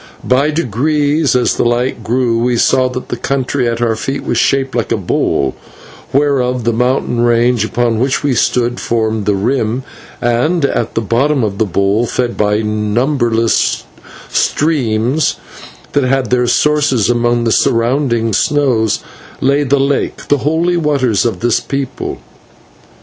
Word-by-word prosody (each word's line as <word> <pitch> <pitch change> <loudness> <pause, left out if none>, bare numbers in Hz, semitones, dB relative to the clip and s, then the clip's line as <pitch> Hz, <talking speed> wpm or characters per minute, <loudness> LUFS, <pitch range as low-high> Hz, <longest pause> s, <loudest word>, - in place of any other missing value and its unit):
By 135 +4 +3
degrees, 150 +1 0
as 125 - +2
the - - 0
light 120 0 -1
grew, 120 0 0
we 120 0 +1
saw 130 +2 +2
that 125 0 -6
the - - -2
country 130 +1 -1
at 115 +1 -2
our 115 -2 +1
feet 135 +5 -4
was - - -1
shaped 135 -1 +1
like 120 -2 -2
a 115 - +2
bowl, 70 -7 0 0.6
whereof 130 -3 +1
the 120 +1 +1
mountain 125 0 0
range 120 -1 +2
upon 115 0 0
which 135 +3 0
we 145 -2 +1
stood 120 0 0
formed 110 -2 -1
the 105 - +2
rim, 120 +3 -1 0.4
and 125 +7 +1
at 120 -4 -2
the 115 - +1
bottom 130 +5 +1
of 100 -2 -3
the 110 - +2
bowl, 100 +5 +1
fed 120 0 -2
by 105 +1 +1
numberless 115 +2 0 0.4
streams 135 -2 0 0.6
that 145 - +1
had 130 -2 0
their 125 -1 +2
sources 145 -3 +2
among 120 0 +1
the 115 - +1
surrounding 120 -1 +1
snows, 125 -5 +1 0.4
lay 140 +2 +2
the 140 0 +1
lake, 140 +1 -1
the 145 - +3
Holy 165 +5 0
Waters 140 - +1
of 115 - -4
this 120 -1 +2
people. 135 -2 -4
125 Hz, 150 wpm, -14 LUFS, 115-140 Hz, 0.6 s, By